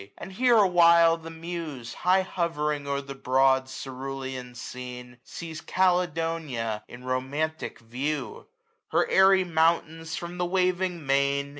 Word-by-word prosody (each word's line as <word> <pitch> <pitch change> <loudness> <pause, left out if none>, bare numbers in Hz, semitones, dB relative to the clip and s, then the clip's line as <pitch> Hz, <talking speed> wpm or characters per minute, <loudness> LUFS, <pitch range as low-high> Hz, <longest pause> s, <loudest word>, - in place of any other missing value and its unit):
And 190 - -9
here 245 +3 +4
a 205 -3 +6
while 170 -2 +6
the 165 0 -10
Muse, 160 -7 -6
High 185 +1 +2
hovering 150 -5 -2
o*er 140 0 -1
the 140 0 -8
broad 130 0 +2
cerulean 130 -1 -6
scene^ 125 0 -8
Sees 160 -2 -8
CALEDoifiA, 165 - 0
in 120 +1 -12
romantic 135 +5 -2
view: 130 +2 -4 0.4
Her - - +1
airy 190 0 +5
mountains, 165 -1 0
from 175 -1 -6
the 180 - +1
waving 180 -2 0
main. 140 +1 +1
155 Hz, 130 wpm, -27 LUFS, 130-175 Hz, 0.4 s, a